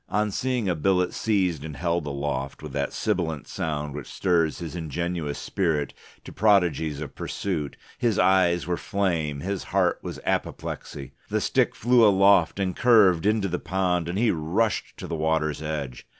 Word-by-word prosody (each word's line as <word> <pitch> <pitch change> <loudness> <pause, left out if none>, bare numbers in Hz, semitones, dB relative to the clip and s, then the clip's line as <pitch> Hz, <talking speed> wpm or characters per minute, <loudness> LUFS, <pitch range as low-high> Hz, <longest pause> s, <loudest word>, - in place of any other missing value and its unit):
On 105 +1 0
seeing 125 0 -1
a 90 - +2
billet 90 +2 +1
seized 95 -9 0
and 75 -3 -7
held 85 -2 -1
aloft 70 -1 -3
with 75 - -7
that 70 0 -1
sibilant 80 -5 -2
sound 75 -3 -3
which 70 -3 -7
stirs 85 -4 +1
his 85 -1 -6
ingenuous 85 -2 -3
spirit 80 -7 -1 0.3
to - - -10
prodigies 90 -8 +2
of 75 - -6
pursuit, 80 -8 -4 0.2
his 115 -4 +1
eyes 90 -2 +3
were 90 0 -1
flame, 80 -8 -1
his 95 +3 -3
heart - - +1
was - - -6
apoplexy. 70 -2 -4 0.2
The - - +1
stick - - +1
flew 120 +1 +4
aloft 100 -3 +5
and 95 -2 -1
curved 105 -8 +5
into 105 -2 +2
the 90 -1 -2
pond, 90 -1 -1
and 90 - -2
he 115 +1 +3
rushed 95 +7 -1
to - - -7
the - - -5
water's 80 -1 0
edge. 75 -5 -5
85 Hz, 165 wpm, -25 LUFS, 75-95 Hz, 0.3 s, aloft